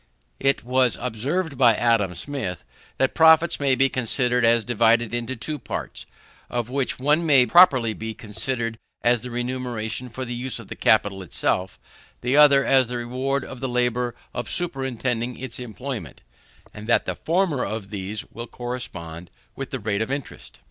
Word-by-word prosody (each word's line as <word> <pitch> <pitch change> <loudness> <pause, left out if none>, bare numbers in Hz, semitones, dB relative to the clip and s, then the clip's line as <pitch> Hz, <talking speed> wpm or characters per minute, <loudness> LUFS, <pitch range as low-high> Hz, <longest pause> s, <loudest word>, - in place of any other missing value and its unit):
It 135 0 +1
was 125 0 +2
observed 140 +6 -2
by 120 -4 +6
Adam 110 -7 +2
Smith, 95 - -4 0.3
that 135 - +1
profits 160 +1 +5
may 140 -2 +3
be 135 +1 +4
considered 125 -1 0
as 115 -1 +4
divided 115 0 +2
into 120 +2 -3
two 150 +6 -5
parts, - - -6 0.4
of 120 0 -3
which 135 -1 -1
one 150 +5 +2
may 140 -6 +5
properly 130 -9 +5
be 110 0 -6
considered 115 +2 -3 0.2
as 120 -1 +3
the 125 - -7
remuneration 120 -1 -3
for 130 +3 -6
the 120 - -5
use 125 +2 -3
of - - -8
the - - -6
capital 100 -2 +2
itself, 90 +1 -2 0.4
the 125 +3 0
other 140 -2 +6
as 130 -2 +4
the 125 +1 -4
reward 130 +3 -2
of 130 - -9
the 130 0 -3
labour 125 0 0 0.2
of 120 -4 -4
superintending 125 - -1
its 125 -2 -6
employment; 125 - -6 0.5
and 105 +1 -9
that 120 - +3
the - - -2
former 170 -5 0
of 105 -1 -5
these 100 +1 -4
will 115 +2 -7
correspond 90 -10 -6 0.3
with - - -5
the - - -3
rate 100 0 -1
of 110 - -2
interest. 140 -1 -6
125 Hz, 170 wpm, -23 LUFS, 115-135 Hz, 0.5 s, by